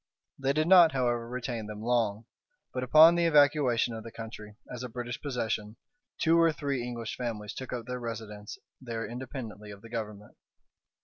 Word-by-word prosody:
They 135 0 +1
did 155 +2 +1
not, 175 -4 +8
however, 120 -3 0
retain 120 -3 -4
them 105 0 -7
long; 115 -2 0 0.5
but, 125 - -2
upon 155 +6 +8
the 170 0 +2
evacuation 145 -6 +4
of 110 -1 -6
the 115 - -9
country 110 -2 -9 0.2
as 125 - -6
a 125 - -5
British 120 +1 -5
possession, 110 -6 -3 0.4
two 165 +1 +3
or 165 -1 +5
three 140 -4 -2
English 120 -2 -5
families 110 -4 -4
took 130 - -7
up 120 -2 -4
their 125 +1 -4
residence 110 -3 -7 0.2
there 115 -3 -4
independently 120 -4 -7
of 100 -1 -11
the 115 - -11
Government. 105 -3 -6
120 Hz, 175 wpm, -29 LUFS, 110-135 Hz, 0.5 s, not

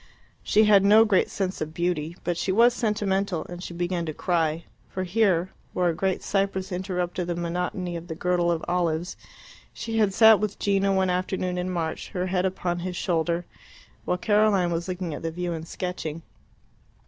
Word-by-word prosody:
She 215 - +3
had 205 -2 +6
no 215 +3 +7
great 200 -4 +2
sense 190 -1 -3
of 155 +1 -4
beauty, 170 -1 -1
but 175 - -1
she 185 - -1
was 235 +5 +5
sentimental, 200 -6 -1
and 175 0 -8
she 180 - -7
began 175 0 -2
to 155 - -4
cry; 165 -2 0 0.3
for 185 - -3
here, 185 -2 +1 0.2
where 180 -1 +2
a - - 0
great 190 +3 -1
cypress 195 -1 -1
interrupted 180 -1 -2
the 175 - -1
monotony 175 +1 -3
of 170 +1 -7
the 160 - -5
girdle 175 0 +1
of 165 -1 -2
olives, 175 -1 -1 0.6
she 225 -1 -3
had 210 -2 +3
sat 220 +1 +7
with 210 -1 -2
Gino 195 -1 +1
one 190 -1 +2
afternoon 180 0 -1
in 180 +1 -2
March, 165 -3 -3
her 180 -1 -1
head 185 0 +1
upon 175 -2 -2
his 180 +1 -4
shoulder, 170 0 0 0.6
while 180 - 0
Caroline 205 -3 +3
was 170 +1 -2
looking 180 -3 -3
at - - -6
the 165 - -2
view 175 +1 -3
and 160 0 -6
sketching. 165 -3 -5
180 Hz, 185 wpm, -25 LUFS, 170-195 Hz, 0.6 s, no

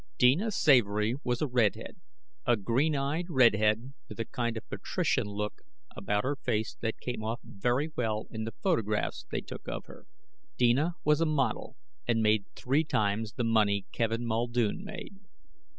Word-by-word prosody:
Deena 145 - +4
Savory 115 - +3
was 125 +3 0
a - - +1
redhead, 120 -5 0 0.5
a 120 -1 +4
green 130 +9 +1
eyed 140 +5 -1
redhead 115 -2 +3 0.2
with 110 - -9
a 115 - -1
kind 120 -1 -2
of 110 - -8
patrician - - -1
look 105 +1 -4 0.3
about 105 - 0
her 140 +3 0
face 110 -4 -1
that 115 -1 -2
came 120 -3 -4
off 115 +3 -2
very 125 +9 -1
well 110 -3 -1
in 110 0 -4
the 115 0 -5
photographs 110 - 0
they - - -2
took - - -9
of - - -4
her. - - -14 0.5
Deena 135 +8 +3
was 150 +1 +3
a - - +4
model, 135 -7 0 0.3
and 115 -2 +2
made 105 -2 +3
three 140 +5 +1
times 110 -5 0
the 125 - -2
money 105 -3 +2
Kevin 115 +1 -1
Muldoon 120 - 0
made. 200 -1 -8
120 Hz, 165 wpm, -30 LUFS, 110-135 Hz, 0.5 s, Deena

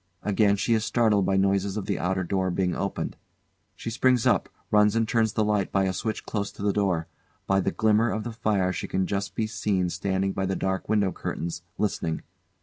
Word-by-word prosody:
Again 100 0 +3
she 110 +3 +1
is 110 -1 +2
startled 110 -5 +2
by 95 - +2
noise 100 +1 +1
of 105 - -3
the - - -1
outer 95 +1 0
door 95 +1 0
being 90 0 0
opened. 100 - -3 0.6
She 115 - -5
springs 125 0 +2
up, - - +2 0.2
runs 105 0 +4
and 115 -1 +2
turns 110 -2 +2
the 110 - +2
light 105 -2 0
by 95 - +2
a 95 -1 0
switch 110 +3 -3
close 100 -2 -2
to - - -8
the 100 -1 +2
door. 95 -5 +1 0.4
By 95 0 +2
the - - +1
glimmer 110 +1 +3
of 110 0 -2
the 120 +1 -5
fire 105 -5 +1
she - - -4
can 95 0 0
just 100 +1 -3
be 110 - 0
seen 95 -4 -1
standing 95 +1 -1
by 95 -1 -1
the 95 - -1
dark 95 +1 -2
window 105 -3 +2
curtains, 85 -1 -4 0.2
listening. 85 -6 -1
100 Hz, 215 wpm, -26 LUFS, 95-110 Hz, 0.6 s, runs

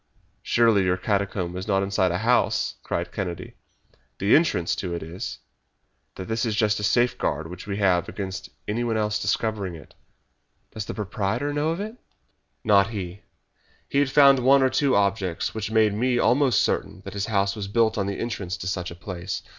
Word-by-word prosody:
"Surely 115 -4 +3
your 90 0 +1
catacomb 95 -2 -1
is 95 +2 -5
not 95 -2 +2
inside 95 -2 +1
a 90 - 0
house!" 120 +5 +2
cried 85 0 -3
Kennedy. 90 -4 -5 0.6
"The 100 +3 +4
entrance 150 - +2
to 90 -3 -3
it 85 - -5
is. 85 +3 -6 0.8
That 95 +3 -7
is 110 -1 0
just 105 -1 +2
the - - -5
safeguard 105 - +1
which 90 +4 -9
we 100 -1 -3
have 90 -4 +2
against 95 -2 -6 0.2
anyone 115 +1 -1
else 105 -1 0
discovering 105 -6 -1
it." 75 -4 -14 0.8
"Does 110 -2 -5
the - - -6
proprietor 105 +7 -2
know 145 +2 0
of 165 +2 -2
it?" 215 +4 -5 0.7
"Not 100 -2 +4
he. 100 -3 -6 0.7
He 140 - +1
had 140 -2 +2
found 140 -1 +6
one 135 +2 +5
or 130 - +3
two 135 0 +2
objects 100 -4 0
which 110 -1 -3
made 110 -2 +3
me 120 +4 +1
almost 130 +1 +3
certain - - -1
that - - -9
his 100 -1 -2
house 100 -3 +1
was 100 -3 -5
built 110 +1 +2
on 100 -2 -1
the 100 - -3
entrance 100 -6 -4
to 90 - -6
such 90 -1 -2
a 85 - -9
place. 90 +1 -5
100 Hz, 185 wpm, -25 LUFS, 95-115 Hz, 0.8 s, found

